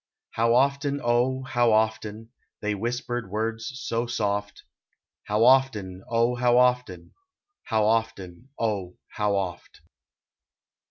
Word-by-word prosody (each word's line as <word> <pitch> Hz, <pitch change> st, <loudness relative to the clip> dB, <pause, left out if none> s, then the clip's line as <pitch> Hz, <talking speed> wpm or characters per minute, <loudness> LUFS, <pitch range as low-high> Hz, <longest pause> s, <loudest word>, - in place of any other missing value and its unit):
I 115 Hz, -, +1 dB
low 115 Hz, 0 st, +4 dB
often, 140 Hz, +2 st, +1 dB
oh! 125 Hz, +2 st, +1 dB
how 120 Hz, -3 st, +2 dB
often 110 Hz, 0 st, -1 dB, 0.3 s
They 105 Hz, 0 st, -1 dB
whispered 120 Hz, +1 st, -3 dB
words 110 Hz, +3 st, -3 dB
so 115 Hz, -1 st, -2 dB
soft; 105 Hz, -3 st, -2 dB, 0.6 s
How 105 Hz, +2 st, +1 dB
often, 110 Hz, -8 st, +2 dB
oh! 115 Hz, +1 st, +2 dB
how 120 Hz, 0 st, +2 dB
often, 125 Hz, -8 st, +1 dB, 0.5 s
How 110 Hz, -2 st, +1 dB
often, 110 Hz, -1 st, -2 dB
oh! 100 Hz, -5 st, -2 dB
how 105 Hz, -1 st, -1 dB
oft. 90 Hz, -3 st, -5 dB
115 Hz, 115 wpm, -25 LUFS, 105-120 Hz, 0.6 s, low